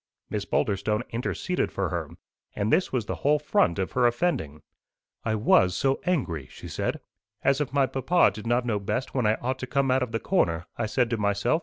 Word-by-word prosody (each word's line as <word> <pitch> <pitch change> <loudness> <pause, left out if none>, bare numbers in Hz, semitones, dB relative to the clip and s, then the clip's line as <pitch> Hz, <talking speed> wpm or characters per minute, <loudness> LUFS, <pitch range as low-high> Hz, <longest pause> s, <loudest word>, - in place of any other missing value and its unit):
Miss 105 -1 -2
Boulderstone 105 -1 0
interceded 110 -6 -2
for - - -1
her; - - -3 0.5
and 105 +2 0
this 185 - +2
was 125 -5 -1
the - - -4
whole 150 +2 +3
front 125 - +2
of 95 -2 -2
her 125 -1 +3
offending. 115 - -1 0.6
"I 110 -1 0
was 95 -4 +4
so 135 +5 +1
angry!" 90 - -1
she - - -10
said. - - -2 0.4
"'As 135 +2 +3
if 145 - -2
my 140 -1 +3
papa 135 - +3
did 105 +2 -8
not 120 +1 +2
know 110 -4 0
best 110 +6 -3
when 125 -5 +1
I 110 - +3
ought 130 +3 -3
to 130 - -5
come 140 0 +1
out 130 +1 +3
of 125 -3 -2
the 115 - -1
corner!' 85 - +1
I - - -2
said 120 +1 +1
to 115 - +1
myself. 105 +8 +1
120 Hz, 210 wpm, -26 LUFS, 100-135 Hz, 0.6 s, was